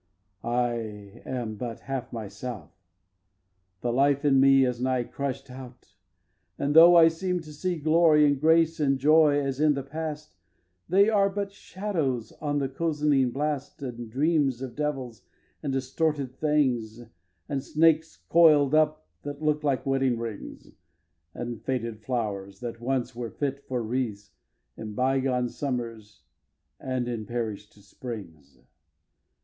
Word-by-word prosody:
xvii. 120 Hz, -, -5 dB
I 120 Hz, 0 st, +1 dB, 0.5 s
am 115 Hz, -4 st, -4 dB
but 115 Hz, 0 st, -6 dB
half 135 Hz, -2 st, -5 dB
myself. 105 Hz, -4 st, -7 dB, 1.1 s
The 120 Hz, -1 st, -1 dB
life 140 Hz, +2 st, +2 dB
in 135 Hz, -2 st, +5 dB
me 135 Hz, 0 st, +6 dB
Is 125 Hz, -1 st, -2 dB
nigh 130 Hz, -1 st, +1 dB
crush'd 135 Hz, +1 st, -5 dB
out; 125 Hz, -5 st, -12 dB, 0.6 s
and, 145 Hz, +1 st, -1 dB
though 170 Hz, +2 st, +9 dB
I 165 Hz, -1 st, +8 dB
seem 180 Hz, +2 st, -1 dB
to 155 Hz, -2 st, -11 dB
see 175 Hz, +4 st, -2 dB
Glory, 155 Hz, 0 st, +4 dB
and 145 Hz, -2 st, +1 dB
grace, 160 Hz, +1 st, +3 dB
and 135 Hz, -2 st, +2 dB
joy, 150 Hz, +1 st, +5 dB
as 135 Hz, -1 st, -2 dB
in 150 Hz, -1 st, +4 dB
the 140 Hz, -, -3 dB
past, 155 Hz, +1 st, -6 dB, 0.6 s
They 195 Hz, +4 st, +5 dB
are 200 Hz, -3 st, +3 dB
but 200 Hz, 0 st, -4 dB
shadows 170 Hz, -, -3 dB
on 145 Hz, -1 st, -1 dB
the 140 Hz, -2 st, 0 dB
cozening 145 Hz, -2 st, +1 dB
blast, 145 Hz, 0 st, -3 dB
And 120 Hz, -3 st, -6 dB
dreams 140 Hz, 0 st, +1 dB
of 130 Hz, -3 st, -7 dB
devils 135 Hz, -6 st, -3 dB, 0.4 s
and 140 Hz, -, -3 dB
distorted 135 Hz, +1 st, -1 dB
things, 125 Hz, -7 st, 0 dB, 0.4 s
And 135 Hz, -2 st, -3 dB
snakes 160 Hz, 0 st, +2 dB
coiled 155 Hz, -4 st, +5 dB
up 155 Hz, -, +2 dB, 0.2 s
that 145 Hz, +1 st, -7 dB
look 150 Hz, 0 st, +1 dB
like 140 Hz, -3 st, 0 dB
wedding 135 Hz, -3 st, +1 dB
rings, 115 Hz, -3 st, -7 dB, 0.6 s
And 120 Hz, -2 st, -5 dB
faded 115 Hz, -4 st, -3 dB
flowers 105 Hz, -5 st, -4 dB
that 115 Hz, -1 st, -6 dB
once 125 Hz, -1 st, -2 dB
were 120 Hz, -1 st, -4 dB
fit 140 Hz, +1 st, -3 dB
for 125 Hz, -2 st, -2 dB
wreaths 110 Hz, -4 st, -3 dB, 0.4 s
In 105 Hz, -1 st, -7 dB
bygone 130 Hz, -1 st, +1 dB
summers 115 Hz, -7 st, -5 dB, 0.6 s
and 130 Hz, -2 st, -2 dB
in 115 Hz, -3 st, -4 dB
perish'd 110 Hz, -4 st, -4 dB
springs. 85 Hz, -, -9 dB
135 Hz, 140 wpm, -27 LUFS, 120-150 Hz, 1.1 s, though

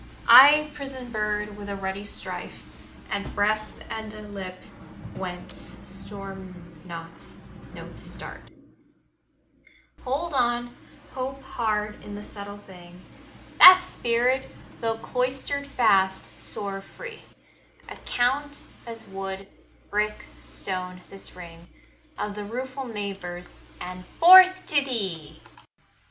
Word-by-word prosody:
I 295 Hz, +3 st, +9 dB
prison 270 Hz, -4 st, -7 dB
bird, 210 Hz, -1 st, -2 dB
with 205 Hz, -1 st, -8 dB
a 200 Hz, -, -3 dB
ruddy 195 Hz, +1 st, -4 dB
strife -, -, -5 dB, 0.5 s
At 200 Hz, -, -3 dB
breast, 215 Hz, +1 st, 0 dB
and 220 Hz, -1 st, -5 dB
a 215 Hz, -, -9 dB
lip 195 Hz, -3 st, -7 dB, 0.6 s
whence -, -, -8 dB
storm 195 Hz, -2 st, -8 dB, 0.3 s
notes 165 Hz, -1 st, -10 dB, 0.7 s
start -, -, -5 dB
20 -, -, -23 dB, 1.5 s
Hold 290 Hz, +6 st, -2 dB
on, 240 Hz, -2 st, 0 dB, 0.4 s
hope 270 Hz, +1 st, -5 dB
hard 215 Hz, -4 st, -2 dB
in 205 Hz, -, -8 dB
the 205 Hz, -, -7 dB
subtle 200 Hz, -1 st, -8 dB
thing 180 Hz, -3 st, -14 dB, 0.6 s
That's 365 Hz, 0 st, +11 dB
spirit: 245 Hz, -1 st, +1 dB, 0.3 s
tho' 225 Hz, -1 st, -1 dB
cloistered 265 Hz, +4 st, -1 dB
fast, 195 Hz, -8 st, +2 dB
soar 200 Hz, -1 st, -4 dB
free; 455 Hz, -, -10 dB, 0.7 s
Account 285 Hz, +4 st, -1 dB, 0.3 s
as 230 Hz, -1 st, -8 dB
wood, 195 Hz, 0 st, -6 dB, 0.4 s
brick, 210 Hz, +1 st, -1 dB
stone, 180 Hz, -1 st, -3 dB
this 195 Hz, -2 st, -7 dB
ring 170 Hz, -1 st, -11 dB, 0.5 s
Of 210 Hz, -, -3 dB
the 205 Hz, 0 st, -6 dB
rueful 255 Hz, +4 st, -5 dB
neighbours, 195 Hz, -5 st, -6 dB, 0.2 s
and 180 Hz, 0 st, -7 dB, 0.2 s
forth 370 Hz, +2 st, +9 dB
to 290 Hz, -2 st, +3 dB
thee! 195 Hz, -, -3 dB
210 Hz, 110 wpm, -26 LUFS, 195-260 Hz, 1.5 s, That's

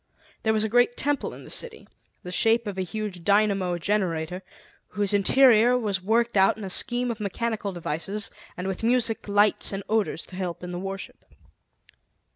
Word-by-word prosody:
There 220 Hz, -, +1 dB
was 215 Hz, -1 st, +1 dB
a -, -, +1 dB
great 245 Hz, +2 st, +3 dB
temple 290 Hz, 0 st, 0 dB
in -, -, -11 dB
the -, -, -9 dB
city, 480 Hz, -2 st, -3 dB, 0.4 s
the 180 Hz, -, -7 dB
shape 225 Hz, +5 st, +2 dB
of 205 Hz, -2 st, -4 dB
a 190 Hz, -, -2 dB
huge 195 Hz, -2 st, -5 dB
dynamo 200 Hz, -3 st, +2 dB
generator, 180 Hz, -2 st, -1 dB, 0.5 s
whose 205 Hz, 0 st, -1 dB
interior 240 Hz, +3 st, +5 dB
was 205 Hz, -5 st, -1 dB
worked 230 Hz, +4 st, +1 dB
out 195 Hz, +1 st, +4 dB
in 215 Hz, -, -8 dB
a 190 Hz, -, -4 dB
scheme 245 Hz, +4 st, 0 dB
of 225 Hz, -, -6 dB
mechanical 210 Hz, 0 st, -2 dB
devices, 175 Hz, +4 st, -4 dB, 0.3 s
and 180 Hz, -, -4 dB
with 190 Hz, -1 st, -3 dB
music, 230 Hz, -1 st, +1 dB
lights, 205 Hz, +1 st, +3 dB
and 195 Hz, 0 st, -4 dB
odors 215 Hz, -6 st, 0 dB
to 185 Hz, -, -12 dB
help 180 Hz, -2 st, -4 dB
in 180 Hz, -, -5 dB
the 175 Hz, -, -4 dB
worship. 195 Hz, +1 st, -7 dB
205 Hz, 180 wpm, -25 LUFS, 185-225 Hz, 0.5 s, interior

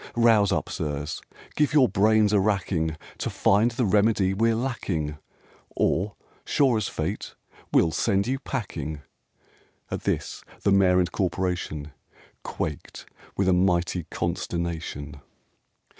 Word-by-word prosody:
Rouse 115 Hz, -4 st, +4 dB
up, -, -, 0 dB
sirs! 75 Hz, 0 st, -4 dB, 0.3 s
Give 150 Hz, -1 st, +2 dB
your 135 Hz, -4 st, +6 dB
brains 105 Hz, +1 st, +3 dB
a 105 Hz, -, +5 dB
racking, 90 Hz, -6 st, 0 dB, 0.2 s
To -, -, -2 dB
find 105 Hz, +4 st, +3 dB
the 120 Hz, +1 st, -1 dB
remedy 100 Hz, -1 st, +3 dB
we're 115 Hz, +3 st, +2 dB
lacking, 90 Hz, -, -2 dB, 0.6 s
Or, 100 Hz, +5 st, +1 dB, 0.3 s
sure 130 Hz, -5 st, +2 dB
as 110 Hz, -, -1 dB
fate, 85 Hz, +7 st, -4 dB, 0.4 s
we'll 80 Hz, -, +4 dB
send 100 Hz, +2 st, +1 dB
you 130 Hz, +3 st, -1 dB
packing!" 80 Hz, -, -4 dB, 0.9 s
At -, -, -3 dB
this -, -, -2 dB, 0.2 s
the 100 Hz, -, +3 dB
Mayor 95 Hz, -2 st, +5 dB
and 90 Hz, -1 st, +2 dB
Corporation 90 Hz, -5 st, -2 dB, 0.5 s
Quaked 75 Hz, -2 st, -5 dB, 0.3 s
with 100 Hz, -, +1 dB
a 95 Hz, -, +5 dB
mighty 90 Hz, -1 st, +1 dB
consternation. 85 Hz, -4 st, -4 dB
95 Hz, 125 wpm, -25 LUFS, 85-110 Hz, 0.9 s, your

